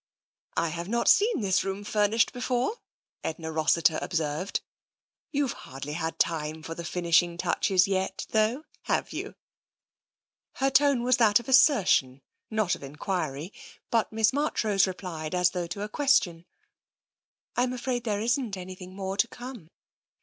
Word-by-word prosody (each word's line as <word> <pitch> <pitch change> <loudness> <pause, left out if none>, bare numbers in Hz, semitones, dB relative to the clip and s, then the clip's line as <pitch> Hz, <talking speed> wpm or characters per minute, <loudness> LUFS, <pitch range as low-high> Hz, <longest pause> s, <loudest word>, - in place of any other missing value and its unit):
" - - -31
Fve 170 +1 -1
not 235 +3 0
seen 420 - +4
this 195 -2 +2
room 195 +1 -4
furnished 210 +2 +2
before," 250 - -1 0.4
Edna 160 0 -4
Rossiter 160 0 +2
observed. 160 +2 -2 0.4
" - - -69
You've 285 -4 0
hardly 135 +3 -8
had 160 0 -3
time 155 -1 -1
for 165 - -5
the 170 - -7
finishing 170 0 +2
touches 185 +1 +2
yet, 190 0 -1
though, 225 +7 +1 0.2
have - - -1
you? - - -5 0.6
" - - -69
Her 270 0 +2
tone 275 -3 +4
was 250 0 +3
that 215 -3 +5
of 240 - -12
assertion, 200 - +4 0.3
not 215 -4 +1
of - - -4
enquiry, 150 +2 -4 0.4
but 230 -2 +1
Miss 220 0 +2
Marchrose 220 -9 +2
replied 180 -3 -5
as 180 0 +3
though 175 -2 -3
to 200 +4 -5
a - - -3
question. 205 - +1 0.5
" - - -60
I'm 245 +1 +1
afraid 250 -1 -2
there 210 -3 -1
isn't 235 -3 0
anything 185 0 -9
more 195 0 -4
to 235 - +3
come. 245 -9 -10
195 Hz, 155 wpm, -27 LUFS, 170-240 Hz, 0.6 s, that